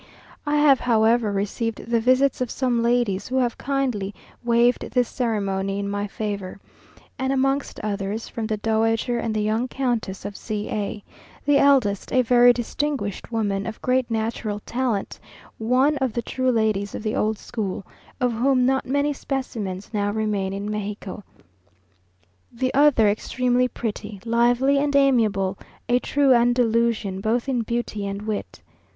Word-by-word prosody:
I 295 - +1
have, 295 -3 +5
however, 225 -1 +3
received 210 +3 -2
the 235 0 +1
visits 255 +3 +2
of 250 - -1
some 245 -3 0
ladies 235 -5 +1
who 255 - -4
have 245 -3 +1
kindly 250 -8 -1 0.3
waived 240 +1 +2
this 250 -2 +1
ceremony 195 -5 -1
in 200 0 -2
my 205 +1 -2
favour; 200 -2 -5 0.6
and 265 0 0
amongst 270 +1 0
others, 205 +1 -3
from 225 -2 -4
the 215 -1 -1
Dowager 225 +2 +1
and 225 -1 -2
the 210 - 0
young 220 +4 0
Countess 240 -7 -2
of 205 - -5
C 210 -1 -4
a; 210 0 -3 0.4
the 290 -1 +4
eldest 260 -8 +3
a 255 -1 +3
very 245 +1 +6
distinguished 245 -3 -3
woman, 200 -3 -1
of 220 - -6
great 255 -1 +1
natural 220 -2 -2
talent, 240 -5 -2 0.4
one 255 +6 +2
of 260 -4 -1
the 235 - -2
true 255 +2 -1
ladies 215 -3 0
of - - -6
the 215 0 -1
old 215 0 0
school, 200 -4 -4 0.3
of 250 -2 +2
whom 255 +2 +2
not 265 +1 +1
many 285 +2 +1
specimens 220 -9 -4
now 205 -1 0
remain 205 -2 -1
in 200 +1 -4
Mexico; 205 -1 -5 1.3
the 255 +2 -2
other 280 -6 +5
extremely 250 +4 +1
pretty, 210 -4 -5
lively, 245 +4 +3
and 285 0 0
amiable, 215 -9 +2 0.3
a 245 +1 +3
true 275 0 +3
Andalusian 235 -4 +2
both 230 +5 0
in 255 -3 0
beauty 225 -3 -3
and 200 +1 -5
wit. 215 -1 -5
230 Hz, 155 wpm, -23 LUFS, 210-255 Hz, 1.3 s, very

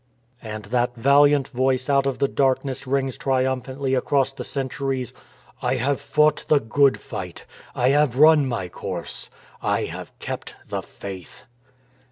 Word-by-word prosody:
And 110 -2 -7
that 120 0 +1
valiant 140 +3 +4
Voice 130 0 0
out 140 -1 +3
of 135 -2 -1
the 140 +1 +2
dark 135 -1 +1
ness 135 -1 -5
rings 135 -1 -1
triumphantly 130 0 -1
across 135 +1 +2
the 135 -2 -7
centuries: 130 -2 -3 0.5
I - - +1
HAVE 130 +2 0
FOUGHT 150 0 +2
THE 150 - +5
GOOD 140 +4 +3
FIGHT; - - -7 0.3
I 125 +1 +2
HAVE 145 -3 +3
RUN 155 -1 +6
MY 115 -8 -2
COURSE; - - -5 0.3
I - - 0
HAVE - - -7
KEPT - - -6
THE - - -2
FAITH. 95 -4 -10
135 Hz, 150 wpm, -23 LUFS, 125-140 Hz, 0.5 s, RUN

